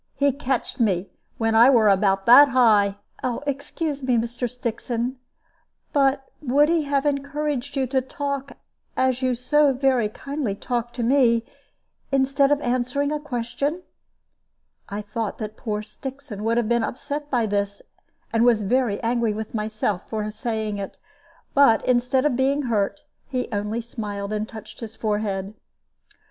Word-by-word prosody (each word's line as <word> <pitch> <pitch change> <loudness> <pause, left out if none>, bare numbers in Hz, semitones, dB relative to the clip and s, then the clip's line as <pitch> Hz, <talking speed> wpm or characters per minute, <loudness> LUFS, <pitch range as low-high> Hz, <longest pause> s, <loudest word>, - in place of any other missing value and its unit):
He 285 0 +3
catched 265 -2 -2
me 195 -5 +1 0.3
when 225 -1 +1
I 230 +3 +7
were 230 -5 +5
about 195 -1 +3
that 265 +5 +9
high 215 -6 +4 0.2
" - - -33 0.2
"Excuse 285 +1 -3
me, 255 -2 +2
Mr. 235 +2 -2
Stixon; 240 +1 -3 0.8
but 275 -1 +2 0.2
would 290 +2 +3
he 330 -3 +2
have 280 0 0
encouraged 285 -1 -2
you 270 -1 +1
to 260 +1 +1
talk 280 +1 -4 0.4
as 260 0 +1
you 255 -1 +1
so 285 +4 +3
very 255 -4 +2
kindly 275 -2 -4
talk 240 +2 -3
to 245 - -3
me, 235 -2 +3 0.7
instead 275 +1 +3
of 290 - +3
answering 255 +3 0
a 300 - -1
question?" 280 +4 -3 1.1
I 205 +1 -4
thought 215 +1 -4
that 215 -1 -6
poor 215 -3 -3
Stixon 260 -1 -8
would 230 +1 +2
have 235 -2 +1
been 235 0 +2
upset 285 +5 -4
by 245 -5 +1
this, 200 -1 -2 0.5
and 225 0 +3
was 235 -3 +4
angry 235 0 +1
with 220 0 -6
myself 215 -3 -2
for 215 -1 -2
saying 220 -2 -3
it; 195 - -6 0.6
but 275 -6 +5
instead 255 +2 +2
of 290 -4 +2
being 275 +3 +1
hurt, 230 +3 0 0.3
he 255 -2 -2
only 210 +2 -2
smiled 210 -3 -5
and 215 +1 -2
touched 220 -1 -10
his 225 -2 -7
forehead. 205 -3 -2
240 Hz, 150 wpm, -24 LUFS, 215-275 Hz, 1.1 s, that